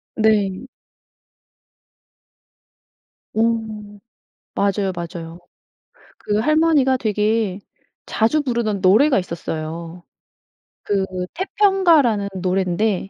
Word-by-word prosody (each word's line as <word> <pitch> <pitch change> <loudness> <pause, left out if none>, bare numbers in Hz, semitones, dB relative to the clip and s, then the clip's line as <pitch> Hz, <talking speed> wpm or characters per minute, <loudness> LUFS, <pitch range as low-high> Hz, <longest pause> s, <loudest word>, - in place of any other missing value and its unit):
네. 215 -1 +1 2.7
어. 220 - 0 1.1
맞아요, 200 -1 0
맞아요. 170 -1 -7 0.8
그 210 0 -1
할머니가 305 -1 +3
되게 210 -2 0 0.5
자주 230 +8 +1
부르던 235 -7 -2
노래가 215 +8 +4
있었어요. 165 0 -6 0.8
그 200 -2 0 0.3
태평가라는 345 - +2
노랜데 190 +2 0
210 Hz, 165 characters per minute, -20 LUFS, 185-255 Hz, 2.7 s, 노래가